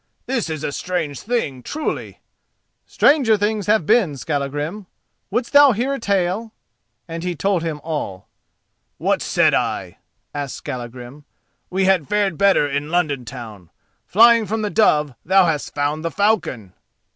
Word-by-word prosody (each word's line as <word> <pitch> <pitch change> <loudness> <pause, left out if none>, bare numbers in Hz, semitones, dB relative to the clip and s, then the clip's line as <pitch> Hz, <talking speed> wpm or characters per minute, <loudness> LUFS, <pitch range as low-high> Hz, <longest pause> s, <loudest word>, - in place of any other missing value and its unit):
This 245 -9 -2
is 155 -2 -4
a - - -2
strange 160 -4 -3
thing, 205 - -2
truly!" 305 - -4 0.7
"Stranger 265 -7 +4
things 210 0 -1
have 210 -6 +3
been, 165 - +2
Skallagrim. 145 +7 -3 0.4
Wouldst 235 +6 -2
thou 285 -2 +7
hear 250 +6 -1
a 275 - -3
tale?" 200 +2 -1 0.5
and 165 0 -6
he 180 -1 -2
told 190 +3 0
him 160 -2 -3
all. 145 - -5 0.7
"What - - 0
said - - +2
I?" - - -2 0.3
asked 145 -2 -4
Skallagrim. 125 +3 -8 0.4
"We 190 +1 0
had 185 -7 +2
fared 205 -4 +1
better 195 -7 +4
in 145 +1 -3
London 155 -7 0
town. 110 -8 -9 0.4
Flying 230 +1 +5
from 220 +2 -2
the 210 - -2
dove 150 - +3
thou 190 +1 +4
hast 155 -4 -2
found 145 +2 -1
the 165 - -1
falcon." 175 - 0
175 Hz, 145 wpm, -20 LUFS, 145-210 Hz, 0.7 s, thou